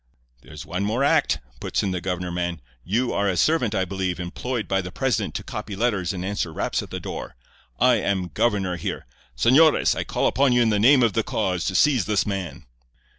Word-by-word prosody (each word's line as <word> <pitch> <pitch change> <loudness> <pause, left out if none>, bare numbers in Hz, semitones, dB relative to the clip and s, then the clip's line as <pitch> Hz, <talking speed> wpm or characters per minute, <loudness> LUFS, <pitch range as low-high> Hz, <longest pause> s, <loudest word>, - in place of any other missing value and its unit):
"'There's 75 0 -10
one 90 +3 -3
more 110 +6 0
act,' 140 - +3 0.2
puts - - -2
in 100 - -1
the 90 -1 -3
governor 90 0 -3
man. 85 -1 -3 0.2
'You 120 - 0
are 100 0 +1
a 90 - -1
servant, 125 - +2
I 95 - +1
believe, 95 -2 -3
employed 110 +7 -4
by 95 0 +1
the 90 0 -7
president - - -1
to - - -3
copy 105 -1 -6
letters 100 -5 0
and 90 -2 -5
answer 100 -4 -2
raps - - -2
at - - -10
the - - -5
door. - - -7 0.4
I 125 -2 +5
am 95 -3 -1
governor 95 -4 0
here. - - -5 0.3
Señores, 145 - +4
I - - -2
call - - -2
upon 135 -2 +3
you 120 - +4
in 115 - +2
the 105 - +1
name 130 +4 +6
of 115 -4 +2
the 115 - +2
cause 95 -5 -2
to 95 - -2
seize 130 -1 +3
this 105 -4 +1
man. 95 -8 -5
100 Hz, 215 wpm, -23 LUFS, 90-120 Hz, 0.4 s, name